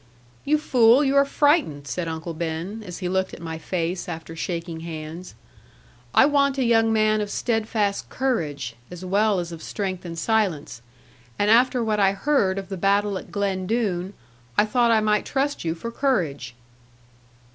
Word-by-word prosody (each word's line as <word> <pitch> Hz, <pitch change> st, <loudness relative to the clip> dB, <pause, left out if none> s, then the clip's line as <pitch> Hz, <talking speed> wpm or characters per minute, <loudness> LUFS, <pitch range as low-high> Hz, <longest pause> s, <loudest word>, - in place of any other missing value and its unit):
'You 305 Hz, +2 st, +3 dB
fool, 250 Hz, -2 st, +5 dB
you 275 Hz, 0 st, +1 dB
are 280 Hz, 0 st, +6 dB
frightened,' 285 Hz, -, +2 dB
said 175 Hz, +3 st, -3 dB
Uncle 160 Hz, +1 st, -4 dB
Ben, 170 Hz, +6 st, -4 dB
as 180 Hz, -4 st, -7 dB
he -, -, +1 dB
looked 190 Hz, +1 st, -1 dB
at -, -, -13 dB
my 160 Hz, -1 st, -6 dB
face 175 Hz, +1 st, -3 dB
after 165 Hz, -1 st, -7 dB
shaking 165 Hz, -1 st, -4 dB
hands: 160 Hz, +1 st, -7 dB, 0.8 s
'I -, -, +7 dB
want 280 Hz, -1 st, +2 dB
a 265 Hz, -, +2 dB
young 225 Hz, -1 st, +3 dB
man 215 Hz, -1 st, +2 dB
of 205 Hz, -, -3 dB
steadfast 215 Hz, -3 st, -1 dB
courage, 150 Hz, -, -2 dB
as 180 Hz, +1 st, -8 dB
well 200 Hz, +1 st, +2 dB
as 170 Hz, -1 st, -4 dB
of 165 Hz, -1 st, -8 dB
strength 190 Hz, -2 st, -4 dB
and 170 Hz, -2 st, -7 dB
silence. 170 Hz, -, 0 dB, 0.6 s
And 205 Hz, +1 st, +2 dB
after 245 Hz, +1 st, +4 dB
what 215 Hz, -2 st, 0 dB
I 195 Hz, -1 st, +4 dB
heard 195 Hz, -3 st, +1 dB
of 195 Hz, 0 st, -5 dB
the 195 Hz, -, -4 dB
battle 200 Hz, +2 st, +2 dB
at -, -, -13 dB
Glen 195 Hz, -2 st, -1 dB
Doone, 200 Hz, -4 st, -1 dB, 0.4 s
I 210 Hz, -, +5 dB
thought 240 Hz, +2 st, +2 dB
I 225 Hz, -1 st, +4 dB
might 210 Hz, -1 st, +2 dB
trust 280 Hz, +1 st, -1 dB
you 165 Hz, -1 st, -1 dB
for 230 Hz, +8 st, -6 dB
courage.' 180 Hz, -, -1 dB
200 Hz, 175 wpm, -24 LUFS, 170-230 Hz, 0.8 s, I